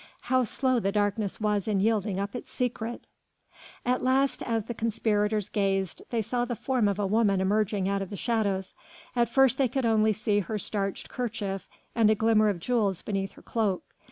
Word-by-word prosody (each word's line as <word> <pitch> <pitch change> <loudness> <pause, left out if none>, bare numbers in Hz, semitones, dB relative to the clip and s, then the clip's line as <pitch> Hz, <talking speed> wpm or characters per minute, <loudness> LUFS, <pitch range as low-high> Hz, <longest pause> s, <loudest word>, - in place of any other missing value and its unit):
How 255 -1 +2
slow 255 +3 +1
the 195 -3 0
darkness 205 0 0
was 210 -2 0
in 205 -2 +1
yielding 210 -2 +1
up 200 +4 -3
its 245 - -6
secret! 240 -1 -3 0.8
At 250 +1 +1
last 265 +1 +2
as 225 -2 -1
the 235 - -5
conspirators 215 -2 0
gazed, 195 -3 -1
they 230 -2 0
saw 240 +3 -1
the 245 0 -2
form 250 -3 +1
of 200 -1 0
a 205 - 0
woman 200 -1 +2
emerging 200 0 +1
out 200 0 0
of 195 - -4
the 205 - -6
shadows. 200 -4 -1 0.4
At 235 -2 +2
first 265 +1 +4
they 270 - +4
could 260 +1 -1
only 220 -1 +3
see 210 -1 +1
her 210 +3 -3
starched 200 -1 -2
kerchief 210 -5 -4 0.2
and 225 -2 +4
a 215 - +4
glimmer 215 0 +3
of 200 - -1
jewels 205 -3 0
beneath 195 -2 -2
her - - -16
cloak. 210 -5 -1
215 Hz, 190 wpm, -28 LUFS, 200-235 Hz, 0.8 s, first